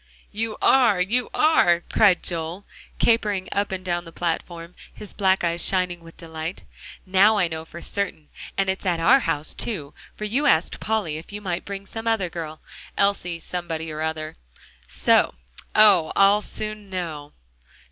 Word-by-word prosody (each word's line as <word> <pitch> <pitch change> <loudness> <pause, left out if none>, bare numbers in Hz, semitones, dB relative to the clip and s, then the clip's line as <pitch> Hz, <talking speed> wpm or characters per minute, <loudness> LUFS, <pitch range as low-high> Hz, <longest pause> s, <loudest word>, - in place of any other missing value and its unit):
"You 215 +1 -3
are 235 -8 +5
you 230 +7 0
are," 175 - +4
cried 195 0 +3
Joel, 170 +3 -3 0.3
capering 210 -5 +1
up 200 0 -1
and 185 -1 -5
down 175 -1 -1
the 165 - -12
platform, 170 0 -4 0.2
his 210 - -9
black 190 -2 +2
eyes 170 0 0
shining 180 -2 +1
with 165 0 -15
delight. 160 +1 -6 0.4
"Now 200 +3 +4
I 185 -4 +3
know 160 -1 -6
for 170 +1 -10
certain, 190 -7 -3 0.3
and 195 - +1
it's 190 0 -1
at 175 -3 0
our 165 +11 +5
house, 150 - -2
too, 155 -11 -4 0.2
for - - -8
you 255 +8 +1
asked 165 - +2
Polly 210 -9 -1
if 160 - -10
you 205 - -6
might 180 -4 -4
bring 200 0 -6
some 225 +3 -7
other 205 -6 0
girl, 155 -2 -7 0.4
Elsie 200 -4 +1
somebody 165 -2 -5
or 155 0 -5
other, 160 0 -3 0.5
so! - - +2 0.4
Oh! 200 -7 +6
I'll 200 +1 +5
soon 215 -1 -6
know." 160 -6 -5
185 Hz, 165 wpm, -23 LUFS, 165-205 Hz, 0.5 s, Oh